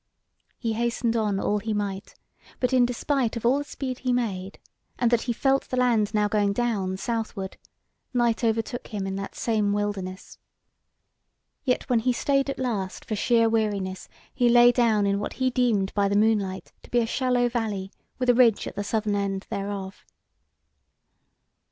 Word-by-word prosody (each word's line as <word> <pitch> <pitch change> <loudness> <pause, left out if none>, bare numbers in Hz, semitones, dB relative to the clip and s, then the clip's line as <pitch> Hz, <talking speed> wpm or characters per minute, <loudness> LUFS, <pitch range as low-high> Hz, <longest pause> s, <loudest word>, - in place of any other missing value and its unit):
He 230 -3 -2
hastened 235 +1 0
on 210 -3 +1
all 210 +1 0
he 215 +1 -2
might, 200 -1 -4 0.4
but 250 0 0
in 250 -1 +5
despite 245 -1 -1
of 230 - -5
all 260 +4 +4
the - - -3
speed 260 -3 -5
he 255 - -1
made, 200 -6 -2 0.4
and 240 -1 +2
that 235 -1 +3
he - - +4
felt 270 +3 +1
the 255 - -2
land 230 -5 +2
now 210 -1 +2
going 205 -1 +1
down 200 -5 -1
southward, 220 -3 -3 0.6
night 240 -2 +1
overtook 225 +1 -1
him 205 -4 -4
in 195 0 -3
that 195 - -6
same 215 -3 0
wilderness. 200 -2 -4 1.2
Yet 255 -3 0
when 245 -2 +3
he 250 +2 +1
stayed 275 +2 +1
at 275 - -3
last 215 -8 -3
for 215 - -2
sheer 230 +2 +3
weariness, 205 -4 -1 0.2
he 245 -2 +3
lay 240 0 +7
down 225 -4 +2
in 200 0 +1
what 205 - -4
he 260 -1 0
deemed 230 -6 +1
by 200 -1 +2
the 200 +1 +1
moonlight 205 -3 +1
to - - -16
be 245 - 0
a 235 - +3
shallow 250 +1 +1
valley, 215 -5 -3 0.3
with 255 - -2
a 245 - +6
ridge 235 -3 +4
at - - -7
the 205 - -2
southern 215 0 -1
end 200 -1 -2
thereof. 200 -2 -5
225 Hz, 175 wpm, -25 LUFS, 200-245 Hz, 1.2 s, lay